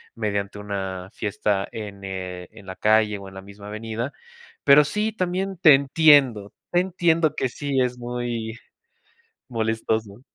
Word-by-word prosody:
mediante 100 -2 -3
una 95 -2 -5
fiesta 100 -1 -1
en, 100 -3 -8
eh, 90 -2 -6
en 100 - -15
la 95 - -6
calle 110 0 +3
o 100 - -10
en - - -16
la 95 - -7
misma 100 +1 -13
avenida. 115 +4 -4 0.5
Pero 145 +1 +7
sí, 210 +8 -1
también 190 -1 -2
te 160 -4 +8
entiendo, 135 -7 +4 0.2
te 175 0 +4
entiendo 170 -4 +1
que 130 - -1
sí 135 +1 -1
es 125 -1 -1
muy 120 -1 -4 0.9
molestoso. 110 -2 -2
110 Hz, 145 wpm, -24 LUFS, 100-140 Hz, 0.9 s, te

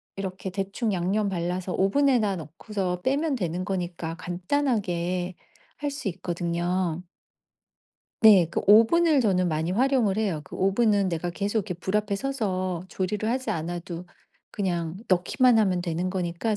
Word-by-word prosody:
이렇게 190 -1 -5
대충 200 +3 -2
양념 195 +4 0
발라서 180 0 -2
오븐에다 215 0 +2
넣고서 180 +3 -4
빼면 285 +2 +1
되는 180 -3 -2
거니까 175 -3 -3
간단하게 180 -3 -1 0.5
할 290 -1 -1
수 275 -5 -5
있거든요. 175 0 -2 1.2
네. 200 -7 +7
그 - - -1
오븐을 275 +9 +6
저는 185 -5 +2
많이 160 +1 -1
활용을 240 -2 +2
해요. 195 -8 0
그 - - -10
오븐은 200 0 +2
내가 175 0 -2
계속 200 +5 -1
이렇게 185 -3 -3
불 190 +4 -2
앞에 210 -1 0
서서 185 -9 -2
조리를 205 +4 -2
하지 255 +2 -1
않아도 175 +2 -4 0.4
그냥 175 -4 -2
넣기만 225 +7 +3
하면 185 -4 +1
되는 175 +1 -2
거니까 185 +4 -1
190 Hz, 305 characters per minute, -26 LUFS, 175-215 Hz, 1.2 s, 네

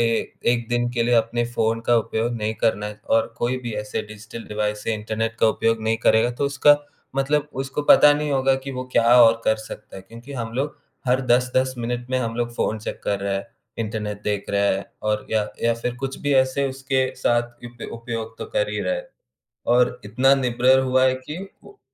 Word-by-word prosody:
ए 115 - +3 0.4
एक 120 -1 -2
दिन 120 0 +1
के 120 - +1
लिए 120 +1 +2
अपने 115 +1 +2
फ़ोन 115 -1 0
का 120 - +5
उपयोग 115 +2 -1
नहीं 110 0 -2
करना 105 -2 0
है 105 0 -8
और 115 0 +2
कोई 120 +2 0
भी 120 - -4
ऐसे 105 +1 -3
डिजिटल 110 +2 -9
डिवाइस 105 0 -2
से 115 - 0
इंटरनेट 110 +1 -3
का - - +5
उपयोग 115 0 +1
नहीं 110 +1 +1
करेगा 110 +2 +4
तो - - +3
उसका 145 +1 +5 0.4
मतलब 145 +2 +1
उसको 135 +2 -4
पता 145 - +8
नहीं 150 0 -1
होगा 135 -1 +3
कि 135 - -4
वो 130 0 -4
क्या - - +3 0.2
और 115 0 +5
कर 110 - +3
सकता 110 -2 -10
है। 95 - -9
क्योंकि 115 +7 -12
हम 115 -4 -4
लोग 140 +3 -2 0.3
हर 125 +1 +3
10-10 125 +2 +2
मिनट 120 +1 -3
में 130 - +1
हम 115 -2 -2
लोग 120 0 -2
फ़ोन 110 - -1
चैक 110 - -6
कर 100 -1 -1
रहे 100 0 -1
हैं, 100 +2 -3 0.3
इंटरनेट 105 -2 -4
देख 105 -1 -1
रहे 100 0 +2
हैं 100 - -5 0.2
और 105 0 -1
या 110 -1 +2 0.2
या 115 0 +3
फिर 120 +1 -3
कुछ 135 +2 -5
भी 145 - 0
ऐसे 135 +1 +2
उसके 135 0 0
साथ 120 0 -1
इप 120 0 -8
उपयोग 115 -1 -5
तो - - -4
कर - - +2
ही - - -2
रहे - - 0
हैं। - - -8 0.7
और 125 0 +3
इतना 125 +6 +4
निर्भर 130 0 +3
हुआ 130 0 +2
है 130 - +4
कि 130 +5 -8 0.3
वो 405 - -16
120 Hz, 215 wpm, -23 LUFS, 110-130 Hz, 0.7 s, पता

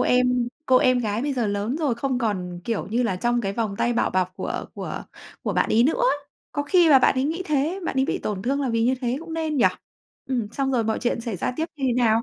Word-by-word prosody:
em 250 -1 +2 0.2
cô 260 - +5
em 255 0 +4
gái 220 0 -1
bây 285 - -1
giờ 245 -5 0
lớn 205 +6 -1
rồi 300 -6 0
không 255 +1 -1
còn, 180 -6 -2
kiểu 230 -3 -2
như 235 +4 0
là, 190 -6 0
trong 240 +3 +1
cái 195 -2 -2
vòng 215 -2 -2
tay 240 +3 +1
bảo 235 - +1
bọc 185 -1 0
của - - -3
của - - -5 0.4
của - - -1
bạn - - +1
ấy 225 - +5
nữa. 405 - +1 0.5
Có 290 - -1
khi 345 +3 +4
là 275 -3 +8
bạn - - +4
ấy 260 +1 0
nghĩ 330 +5 -1
thế, 305 +6 0
bạn 265 - -3
ấy 265 - +4
bị - - -1
tổn 195 -2 -3
thương 275 +4 0
là 270 - 0
vì 230 -1 +1
như 255 - +3
thế 245 0 -1
cũng 330 0 -8
nên, 315 -2 -1
nhỉ? 250 - +4 0.6
Ừm, 240 -5 -1
xong 270 -1 -1
rồi 235 -3 +2
mọi 220 0 0
chuyện 240 -1 -1
xảy 230 -5 -4
ra 215 - -2
tiếp 320 - -1
như 275 - -3
thế 245 - +2
nào? 230 -2 +3
245 Hz, 270 wpm, -24 LUFS, 225-275 Hz, 0.6 s, là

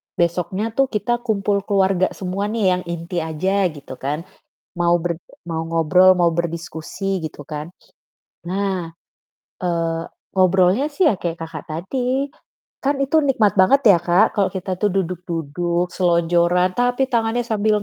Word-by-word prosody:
besoknya 175 +3 0
tuh 270 +4 +2
kita 240 +1 -1
kumpul 210 -4 0
keluarga 190 -2 +2
semua 195 +2 -3
nih 225 0 -2
yang 180 0 0
inti 170 +1 -3
aja 185 +5 0
gitu 140 -2 -9
kan, 150 +4 -3 0.5
mau 175 0 +3
berd 170 -1 -3 0.3
mau 165 -1 -2
ngobrol 165 +3 +4
mau 175 - +4
berdiskusi 170 +2 -3
gitu 155 -2 -6
kan. 150 +2 -6 0.7
Nah, 185 -3 -2 0.7
eee, 165 -2 -1 0.4
ngobrolnya 185 +7 +4
sih 305 +5 -2
ya 195 - -2
kayak 170 -2 -2
Kakak 165 - -7
tadi, 250 - -2 0.5
kan 280 +2 +2
itu 275 +4 +1
nikmat 225 -8 +3
banget 270 +9 +5
ya, 180 - +6
Kak, 175 +5 +4
kalau 200 - +3
kita 185 -1 -4
tuh 210 +1 +1
duduk-duduk 175 -1 -2
selonjoran, 175 +1 +2
tapi 245 +2 +1
tangannya 230 0 +1
sambil 215 -2 +1
185 Hz, 140 wpm, -21 LUFS, 170-210 Hz, 0.7 s, ya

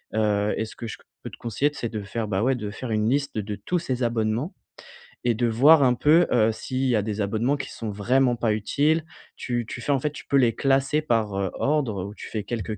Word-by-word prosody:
Heu 105 -1 +1
et 110 - -1
ce 110 - -12
que 115 - -6
je 110 - -7
q - - -25 0.2
peux - - -5
te - - -13
conseiller 120 +6 0
c'est 120 - -4
de 110 -1 -4
faire, 110 +3 -4
bah, 100 -1 -1
ouais 130 +2 +2
de 105 -4 -5
faire 115 +3 -6
une 110 0 +1
liste 140 -1 -1
de 105 0 -3
tous 180 - -2
ces 130 -5 -2
abonnements 115 - -1 0.7
et 120 -2 +2
de 120 +2 +1
voir 140 +7 +6
un 125 -2 +4
peu, 155 +7 +4
heu, 110 -2 +4
s'il 130 +3 -5
y 120 -3 +3
a - - +2
des 105 0 -3
abonnements 110 +7 +1
qui 135 -2 -6
sont 110 -2 -5
vraiment 120 +5 +2
pas 115 -2 0
utiles, 150 +9 +1 0.3
tu 120 -1 -2
tu - - -6
fais 125 - -2
en 135 - +2
fait 150 +3 -1
tu - - -10
peux - - 0
les 125 -4 +4
classer 135 +2 +2
par 115 -8 0 0.2
ordre 135 -10 0
ou 100 +2 -7
tu - - -9
fais 110 -2 -4
quelques 110 0 -4
120 Hz, 250 wpm, -25 LUFS, 110-135 Hz, 0.7 s, voir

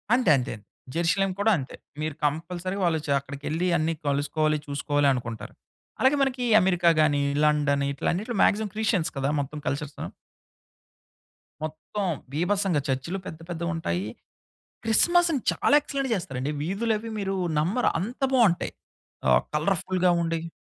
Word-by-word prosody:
అంతే, 250 -6 +2
అంతే. 125 +1 -3 0.4
జెరూషలేం 180 +4 +1
కూడా 215 +2 +3
అంతే. 130 - -6 0.3
మీరు 155 -1 -2
కంపల్సరీగా 175 +6 -2
వాళ్ళు 160 -2 +2
చ - - -6
అక్కడికి 140 +1 -10
వెళ్లి 165 +4 0
అన్ని 165 0 0
కలుసుకోవాలి, 150 +2 +1
చూసుకోవాలి 145 0 +1
అనుకుంటారు. 115 -4 -5 0.5
అలాగే 265 +2 +4
మనకి 255 -2 0 0.2
అమెరికా 180 -2 +3
గాని, 145 -2 +3 0.2
లండన్ 145 -2 +2
ఇట్లా 140 - -3
అన్నిటిలో 210 +5 -3
మాక్సిమం 215 0 +2
క్రిస్టియన్స్ 215 -6 +1
కదా 135 +1 0
మొత్తం 145 +2 -4
కల్చర్సు. 145 +1 -3 1.6
మొత్తం 155 +6 -4 0.3
బీభత్సంగా 180 0 +1
చర్చులు 135 +8 -2
పెద్ద, 160 - -7
పెద్దవుంటాయి. 165 - -2 0.8
క్రిస్మస్‌ని 335 +6 +4
చాలా 285 - +2
ఎక్సలెంట్‌గ 275 -2 -3
చేస్తారండి, 135 -6 -3
వీధులు 210 +7 0
అవి 225 +1 -7
మీరు 195 -1 -2 0.2
నమ్మరు 190 +11 +2
అంత 230 +9 -5
బాగుంటాయి. 215 -9 +3 0.6
ఆహ్, - - +5
కలర్ఫుల్‌గా 180 +3 +1
ఉండేయి 165 0 -2
170 Hz, 130 wpm, -26 LUFS, 145-200 Hz, 1.6 s, ఆహ్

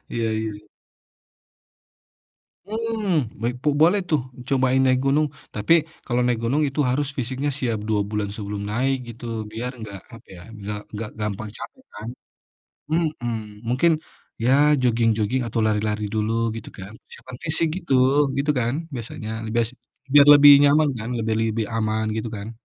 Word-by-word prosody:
Iya, 115 -1 -1
iya. 105 -1 -6 2.0
Mmm, 215 - -1 0.2
baik 120 +2 -1
bu - - +5
boleh 180 +6 +5
tuh, 155 -4 +2 0.3
cobain 130 -1 +2
naik 130 0 +3
gunung. 150 +3 +3 0.3
Tapi 105 +10 +3 0.3
kalau 125 -1 0
naik 120 -2 +1
gunung 140 +6 +1
itu 140 +2 -5
harus 140 +3 0
fisiknya 130 +3 -2
siap 115 -4 -1
2 105 -2 +2
bulan 105 -1 -2
sebelum 100 -1 -5
naik 130 +5 +1
gitu, 115 +1 -9 0.3
biar 120 +3 -4
enggak 105 -4 -8 0.2
apa 115 0 -14
ya, 85 - -11 0.2
biar 105 +1 -4 0.2
enggak 105 +1 -4
gampang 105 0 -3
capek 260 - -10
kan. 105 +3 -6 0.8
Mhm, 120 -10 -2
mungkin 130 +8 +3 0.5
ya 125 - +3 0.3
joging-joging 115 0 +1
atau 115 - -2
lari-lari 105 0 0
dulu 110 0 0 0.2
gitu 115 - -7
kan. 95 +2 -8 0.2
Persiapan 130 -1 -10
fisik 160 0 +1
gitu, 170 -7 -2 0.4
gitu 145 +2 +2
kan, 120 +2 0 0.2
biasanya, 115 -2 -6 0.3
bias 115 -1 +2 0.4
biar 145 -1 +8
lebih 145 0 +9
nyaman 145 +1 +4
kan, 110 - -5 0.2
biar 110 -1 0
lebih 110 0 -1
aman 110 0 0
gitu 110 - -3
kan. 100 +2 -6
120 Hz, 150 wpm, -23 LUFS, 110-140 Hz, 2.0 s, lebih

